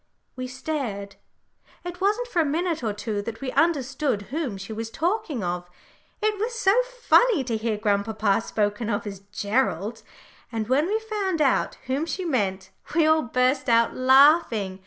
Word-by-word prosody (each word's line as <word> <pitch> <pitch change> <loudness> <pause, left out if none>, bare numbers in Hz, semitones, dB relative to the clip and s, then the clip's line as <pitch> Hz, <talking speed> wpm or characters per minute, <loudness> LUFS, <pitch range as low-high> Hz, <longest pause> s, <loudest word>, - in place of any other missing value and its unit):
We 255 -1 -5
stared 255 -7 -4 0.7
it 355 0 -7
wasn't 425 +5 +1
for 355 -8 +1
a 295 -1 0
minute 340 -6 -2
or 220 - 0
two 205 0 -3
that 225 +2 -6
we 260 0 -4
understood 270 -7 +1
whom 285 -10 -2
she 195 +3 -7
was 225 +1 -5
talking 335 - -2
of. 175 0 -3 0.5
It 425 -1 +1
was 460 +2 -2
so 390 -3 +4
funny - - +3
to 235 -3 -2
hear 220 -1 -1
grandpapa 205 0 +1
spoken 210 0 -1
of 205 +1 -1
as 200 -2 -6
"Gerald" 210 -1 -1 0.5
and 220 -2 -3
when 275 +6 +2
we 425 +3 +1
found 420 -6 -2
out 280 -3 +2
whom 275 +6 -1
she 370 +2 -3
meant, 190 - -1 0.2
we 330 -2 +4
all 315 0 +4
burst 255 +1 +1
out 230 0 +4
laughing. 260 - +4
255 Hz, 165 wpm, -25 LUFS, 215-330 Hz, 0.7 s, so